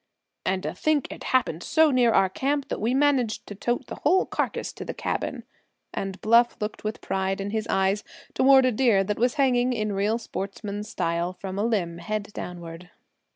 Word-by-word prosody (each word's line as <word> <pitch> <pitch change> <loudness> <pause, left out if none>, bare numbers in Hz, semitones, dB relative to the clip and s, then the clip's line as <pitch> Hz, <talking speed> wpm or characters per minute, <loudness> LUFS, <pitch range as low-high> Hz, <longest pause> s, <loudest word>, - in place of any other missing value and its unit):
"And 190 0 0
to - - -3
think 305 -3 +1
it - - -8
happened 245 -10 +1
so 315 - +4
near 245 -3 +4
our 195 -3 +4
camp 275 +8 -1
that - - -3
we 235 +4 +1
managed 270 -6 +2
to - - -8
tote 240 +5 -2
the - - -8
whole 360 +6 +3
carcass - - -2
to - - -7
the - - -6
cabin," - - -3 0.5
and 195 0 -4
Bluff 235 +2 +4
looked 210 0 -4
with 215 +1 -4
pride 190 0 -1
in 200 +1 -3
his 220 0 -2
eyes 195 +2 +1 0.3
toward 265 0 +6
a 255 - +3
deer 220 -4 +3
that 205 +2 -3
was 245 +4 +2
hanging, 255 -3 +2
in 215 -3 -1
real 205 +3 +1
sportsman 205 -1 -5
style, 175 -4 -2
from 190 +1 -6
a - - +1
limb, 180 -7 -1
head 205 +4 -3
downward. 175 0 -7
215 Hz, 195 wpm, -25 LUFS, 195-250 Hz, 0.5 s, toward